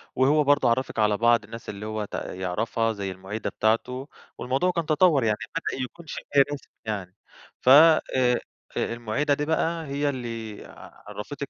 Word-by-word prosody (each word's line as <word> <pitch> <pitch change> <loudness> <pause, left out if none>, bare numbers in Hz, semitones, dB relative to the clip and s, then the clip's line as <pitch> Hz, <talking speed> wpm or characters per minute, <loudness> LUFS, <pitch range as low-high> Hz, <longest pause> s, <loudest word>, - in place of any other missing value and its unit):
وهو 145 +4 +4
برضه 145 -3 +3
عرَّفِك 115 -1 -1
على 105 -1 +3
بعض 115 -1 +4
الناس 115 +3 -9
اللي 105 +1 -6
هو 110 -1 -3
ت - - -18
يعرفها 110 +5 -2
زي 100 -2 -4
المُعيدة 95 +4 -5
بتاعته، 125 +5 0 0.3
والموضوع 135 +9 0
كان 170 -2 -2
تَطَور 155 -3 +4
يعني، 105 -1 +1 0.2
بدأ 150 -5 -2
يكون 160 +7 -10
شِبه - - -7 0.3
رسمي 140 - -9
يعني. 100 -3 -4 0.5
ف - - +2
آآ 130 -4 +6 0.4
المُعيدة 120 +5 0
دي 145 +1 -1
بقى 165 +1 0
هي 145 +1 0
اللي 115 -5 -6 0.4
عرّفتِك - - -6
120 Hz, 155 wpm, -25 LUFS, 110-145 Hz, 0.5 s, آآ